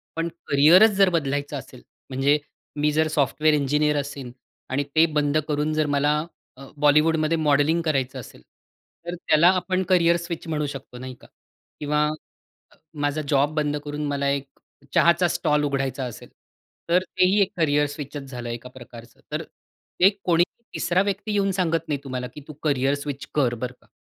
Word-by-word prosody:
पण 165 +1 -1 0.2
करियरच 165 +10 +6
जर 195 -2 +5
बदलायचं 145 -3 -1
असेल, 130 -1 -11 0.3
म्हणजे 135 +3 +2 0.4
मी 150 +1 +2
जर 155 +1 +2
सॉफ्टवेअर 150 +1 +1
इंजिनिअर 150 +1 +1
असीन 140 -3 -5 0.4
आणि 140 +2 0
ते 160 +1 +6
बंद 145 0 +1
करून 150 0 -1
जर 155 0 +1
मला 145 +1 +2 0.4
अ, 135 - -11
बॉलिवूडमध्ये 155 +2 +3
मॉडेलिंग 150 +2 +2
करायचं 135 -3 -1
असेल. 120 - -12 0.6
तर 175 +1 -4
त्याला 160 -1 +3
आपण 185 +1 -1
करियर 170 -2 +4
स्विच 170 0 -6
म्हणू 150 -2 -1
शकतो 135 -3 -8
नाही 130 +1 -7
का? - - -16 0.5
किंवा 150 0 +1 1.0
माझा 145 +2 -1
जॉब 145 +1 +2
बंद 150 -1 0
करून 145 0 -4
मला 140 -1 -1
एक 140 0 -2 0.5
चहाचा 170 +1 +4
स्टॉल 150 -4 +1
उघडायचा 135 -1 -1
असेल, 120 - -9 0.6
तर 180 +2 +3
तेही 185 +2 +2
एक 195 - +1
करियर 150 -2 +2
स्विचच 145 -1 -7
झालं 120 -2 -6
एका 120 +2 -6
प्रकारचं. 120 -2 -13
तर - - -2
ते 190 +2 -1
कोणीही 175 0 +3 0.3
तिसरा 180 +2 +1
व्यक्ती 200 +2 -2
येऊन 195 -1 +1
सांगत 165 -3 -1
नाही 145 -3 -1
तुम्हाला, 125 -2 -4
की 140 +4 -12
तू 155 - -8
करियर 140 -2 +1
स्विच 140 -1 -6
कर 130 -5 +2
बरं 125 +2 -5
का. - - -26
150 Hz, 165 wpm, -24 LUFS, 140-165 Hz, 1.0 s, करियरच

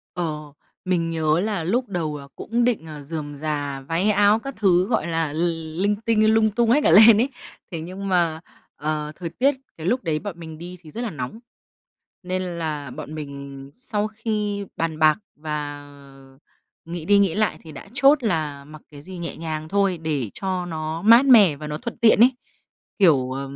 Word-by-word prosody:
Ờ, 150 -4 -4 0.3
mình 170 -2 0
nhớ 160 0 +1
là 205 -5 -2
lúc 245 +7 0
đầu, 160 -6 -3
ờ, 140 -1 -10
cũng 235 +2 -1
định, 230 -9 0
ờ, 150 -2 -8
rườm 145 -1 -6
rà, 145 -2 -3
váy 165 +9 0
áo 205 +1 +4
các 275 +3 -7
thứ, 185 -3 +3
gọi 225 -6 0
là, 165 -3 -1
l - - -6 0.5
linh 205 0 +2
tinh, 220 -1 +4
lung 220 -1 +3
tung 230 +2 +1
hết 290 +5 +5
cả - - +5
lên 215 +1 +8
ấy. 260 - +2 0.4
Thế 165 -3 -5
nhưng 190 +4 -6
mà, 170 -3 +1 0.4
ờ, 150 0 -3
thời 175 -2 -5
tiết 265 - +1 0.2
cái 160 +1 -7
lúc 250 +4 +1
đấy 155 -2 0
bọn 190 -3 -7
mình 160 -1 -9
đi 175 +1 -9
thì 155 -3 -14
rất 230 - -6
là 240 -3 -2
nóng, 145 - -6 0.8
nên 185 +1 -2
là 160 -6 -4
bọn 155 - -8
mình 140 -2 -8
sau 215 -4 -3
khi 210 -2 -3
bàn 160 -1 -2
bạc 155 -1 +5 0.2
và 145 -2 -5 1.0
nghĩ 165 -1 -6
đi 205 +2 +4
nghĩ 195 -5 +2
lại 215 0 0
thì 160 -2 -11
đã 140 - -11
chốt 275 0 +5
là 155 -9 -2
mặc 155 +1 -13
cái 145 -1 -12
gì 185 +1 -9
nhẹ 170 - -5
nhàng 155 -1 -5
thôi 195 -2 +1
để 145 -9 -2
cho 185 -2 -3
nó 160 0 -4
mát 230 +5 +7
mẻ 205 - +7
và 150 +1 -8
nó 150 0 -4
thuận 235 - -6
tiện 225 -1 +5
ấy, 255 +2 +7 0.7
kiểu, 135 -9 +4
à, 135 +1 -4
170 Hz, 200 wpm, -23 LUFS, 155-210 Hz, 1.0 s, lên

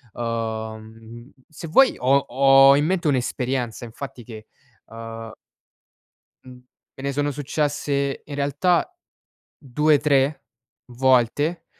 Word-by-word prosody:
Ehm, 115 +1 -6 0.2
se 155 +1 -10
vuoi 260 +12 +4
ho 135 +2 +2
ho 135 +1 +6
in 145 +1 +1
mente 180 -1 -1
un'esperienza 125 -3 -2
infatti 125 +1 -9
che, 110 -1 -12 0.4
ehm 115 0 -9 1.1
mhmm, 130 -1 -13 0.4
me 135 - -10
ne 140 - -1
sono 145 +1 -1
successe 145 -1 -2
in 145 - -8
realtà 145 - 0 0.7
2, 150 +2 +1
3 140 -2 +1 0.5
volte, 130 +7 +1
135 Hz, 105 wpm, -22 LUFS, 115-145 Hz, 1.1 s, ho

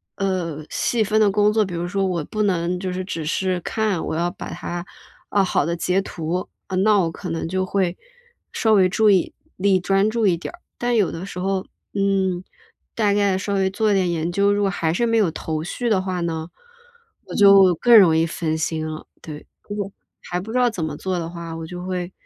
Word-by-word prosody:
呃， 170 -6 -2
细 230 -2 +1
分 215 +1 +1
的 210 - +5
工 210 +1 +3
作， 220 - +3
比 180 - -7
如 170 +1 -2
说 195 +1 0
我 170 -4 -1
不 215 - -3
能 180 -2 0
就 185 0 -3
是 185 0 -3
只 165 -4 -4
是 185 +3 0
看， 215 -5 -1
我 - - -3
要 175 +1 0
把 - - -8
它 175 0 -5 0.5
啊， 200 -1 +3
好 165 -5 +1
的 170 - -1
截 180 +3 +1
图， 180 0 -4 0.4
那 210 -2 +5
我 165 -3 +1
可 180 +2 -7
能 165 0 -3
就 185 +2 -1
会 185 -2 0 0.6
稍 220 -1 +2
微 185 -3 +5
注 215 +2 +3
意 185 -3 +2 0.2
力 190 0 +3
专 195 +3 +2
注 225 -2 +1
一 170 -2 +3
点 175 - -7
儿。 345 - -14 0.2
但 240 0 0
有 205 -5 +2
的 165 +2 -6
时 195 - -9
候， 190 0 -1 0.3
嗯， 190 -2 0 0.5
大 210 -3 +2
概 200 -2 +2
稍 200 +1 -3
微 190 -1 +2
做 215 +2 +1
一 200 - +3
点 185 -2 +2
研 165 +1 -1
究， 200 +2 +2
如 205 - 0
果 195 - +2
还 165 -2 0
是 235 +6 +1
没 230 0 +2
有 205 -6 +3
头 155 -1 -4
绪 235 +8 -3
的 195 -3 +2
话 185 -2 -3
呢， 160 -1 -3 0.8
我 - - -8
就 195 -3 +7
更 235 +7 +5
容 165 -4 +5
易 165 - +3
分 160 -1 -2
心 160 0 -2
了， 155 0 -7 0.2
对。 150 -2 -9 0.8
还 180 0 -3
不 210 +5 -7
知 250 - -1
道 245 - +4
怎 180 -8 -3
么 150 -2 -4
做 185 +1 -2
的 165 -1 -3
话， 170 -1 -7
我 165 - -6
就 180 +2 -7
会， 180 -1 -3
185 Hz, 240 characters per minute, -22 LUFS, 170-200 Hz, 0.8 s, 就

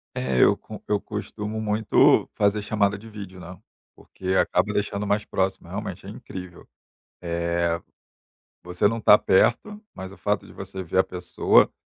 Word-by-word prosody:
É, 65 -1 +1
eu - - +6
co - - -11
eu 105 -1 +1
costumo 105 0 -5
muito 110 0 +3
fazer 100 +1 +2
chamada 100 -1 0
de 110 +2 -12
vídeo, 100 -4 -9
né, 90 +1 -10 0.4
porque 95 - -13
acaba - - +2
deixando 100 0 -1
mais 105 +1 +1
próximo, 95 0 -2
realmente - - -6
é - - -7
incrível. 90 -2 -10 0.5
Eh, 85 0 -1 0.8
você 90 +3 0
não 115 +2 +1
tá 105 - +8
perto, 210 - +2
mas 95 0 -8
o - - -14
fato 105 0 -1
de - - -14
você 95 -1 -7
ver 90 +2 -2
a - - +5
pessoa 90 -1 +2
100 Hz, 160 wpm, -24 LUFS, 90-105 Hz, 0.8 s, tá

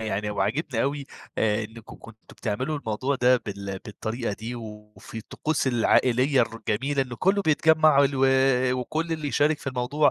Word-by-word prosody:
يعني 105 -1 -2
وعاجبني 110 +6 -1
أوي 140 0 -2 0.3
آآ 110 0 +1
إنّكم 110 +1 -12
كنتم 115 -1 -13 0.2
بتعملوا 130 +8 -2
الموضوع 130 +4 -2
ده 125 0 +4
بال 100 -1 -5
بالطريقة 110 +2 -4
دي، 115 +4 -6
وفي 105 -1 -10
الطقوس 140 +6 -2
العائلية 125 +2 +3
الر 115 - -4
الجميلة 135 +6 +1
إنه 125 -2 -8
كُلّه 200 +2 +2
بيتجمع 155 -2 +4
ال 135 - +2
و 135 - +3 0.6
وكُلّ 160 +6 -3
اللي 155 -2 -3
يشارك 145 +2 +2
في - - -15
الموضوع، 135 +3 +1
125 Hz, 160 wpm, -25 LUFS, 110-145 Hz, 0.6 s, ده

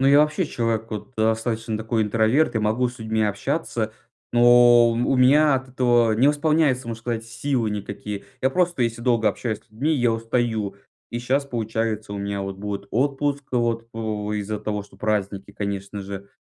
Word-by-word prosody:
Ну, 135 - +3
я 140 +1 +7
вообще 150 +3 +1
человек 115 -3 -1
вот 110 +4 -6
достаточно 110 0 0
такой 110 0 -1
интроверт 115 +8 +2
и - - +2
могу 110 +4 +1
с 120 0 -11
людьми 110 0 -1
общаться, 110 +2 -2 0.4
но 120 0 +6
у - - 0 0.2
у 135 - +3
меня 140 +3 +5
от 130 0 -3
этого 120 -3 +3
не 125 +6 +4
восполняются, 145 -4 +2
можно 115 -1 -5
сказать, 115 -1 -3
силы 115 0 -1
никакие. 100 0 -5 0.2
Я 130 - +3
просто, 175 -4 +1
если 115 0 -2
долго 115 -4 +3
общаюсь 110 +1 -3
с 110 - -33
людьми, 140 +9 0
я 120 -4 +2
устаю, 115 -3 -1 0.3
и 120 - -3
щас 135 +4 0
получается 110 -4 -3
у 100 - -4
меня 100 0 -3
вот 95 -1 -5
будет 100 0 -5
отпуск 140 +1 0
вот, 115 -1 0
у, 105 -2 -3
из-за 105 0 -3
того, 105 -1 -3
что - - -18
праздники, 100 -2 -2
конечно 100 0 -4
же. 100 0 -8
115 Hz, 185 wpm, -23 LUFS, 105-125 Hz, 0.4 s, я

